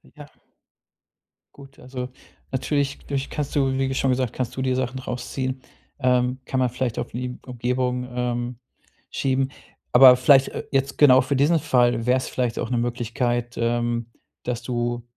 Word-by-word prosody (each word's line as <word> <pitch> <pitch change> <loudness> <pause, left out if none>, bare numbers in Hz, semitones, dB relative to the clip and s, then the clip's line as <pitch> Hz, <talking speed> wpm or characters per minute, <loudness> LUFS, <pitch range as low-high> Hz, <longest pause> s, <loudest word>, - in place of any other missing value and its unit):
Ja. - - -12 1.2
Gut, 140 -1 -15
also 125 0 -6 0.4
natürlich 140 +1 -1
vielleicht 140 -1 -2
kannst 145 -2 -3
du, 135 -2 +2
wie 135 0 0
schon 130 0 +1
gesagt, 125 -2 -1
kannst 125 -1 -3
du 130 - -3
dir 130 -1 +1
Sachen 130 0 -2
rausziehen. 130 +1 -4 0.4
Ähm, 125 -1 +2
kann 130 - -1
man 125 -1 +2
vielleicht 120 -1 -3
auf - - -4
die 125 +1 -5
Umgebung, 125 0 -2
ähm, 120 0 -2 0.6
schieben. 135 0 0 0.4
Aber 125 0 +9
vielleicht, 135 +1 +5
äh, - - -5
jetzt 135 0 0
genau 130 -3 +7
für 135 +2 -1
diesen 150 +5 +3
Fall 120 -4 +2
wäre 125 +1 +4
es 130 - -3
vielleicht 125 -2 -2
auch - - -3
'ne 125 - 0
Möglichkeit, 120 0 -1
ähm, 120 0 0 0.4
dass 120 0 -3
du 120 -1 -2
125 Hz, 160 wpm, -23 LUFS, 120-135 Hz, 1.2 s, Aber